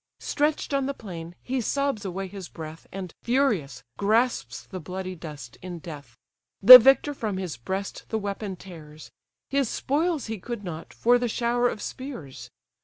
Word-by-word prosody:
Stretch'd 295 0 -1
on 275 -1 +1
the 280 - -3
plain, 170 -4 -8
he 260 0 -1
sobs 275 -2 -1
away 195 0 -4
his 190 -1 -9
breath, 160 0 -9
And, 185 -3 -6
furious, 215 - 0 0.2
grasps 210 - +1
the 185 - -7
bloody 185 +2 -5
dust 150 -8 -10
in 180 -1 -6
death. 145 -8 -10 0.4
The 250 +5 +13
victor 270 +4 +4
from 215 -8 -3
his 185 -4 -4
breast 190 - -5
the 220 - 0
weapon 200 -1 -4
tears; 155 -5 -12 0.4
His 275 -4 +1
spoils 310 +1 0
he 220 -2 -5
could 235 +2 -6
not, 165 -3 -7
for 245 +1 +3
the 245 - 0
shower 240 +2 +1
of 210 - -6
spears. 250 - -7
200 Hz, 165 wpm, -26 LUFS, 170-245 Hz, 0.4 s, The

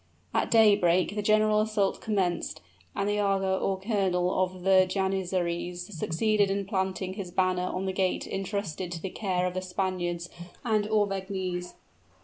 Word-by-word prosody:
At - - +1
daybreak, 200 -5 +4
the 210 - -1
general 215 0 +3
assault 215 -2 0
commenced, 185 -5 -1 0.4
and 200 - 0
the 205 0 +1
aga 195 -2 +1
(or 190 -1 -1
colonel) 190 -3 +1
of 185 -1 -5
the 190 -1 +5
janizaries 180 -1 -2
succeeded 205 +6 +1
in 200 0 -1
planting 190 -1 -2
his 195 -2 -6
banner 185 0 +1
on 185 +1 -3
the 190 - -1
gate 185 -1 0
intrusted 195 -3 -3
to 170 - -5
the 185 +3 -5
care 185 -4 -1
of 180 - -1
the 185 - -2
Spaniards 180 -2 -2 0.4
and 215 -3 +2
Auvergnese. 190 -4 -1
190 Hz, 150 wpm, -28 LUFS, 180-200 Hz, 0.4 s, the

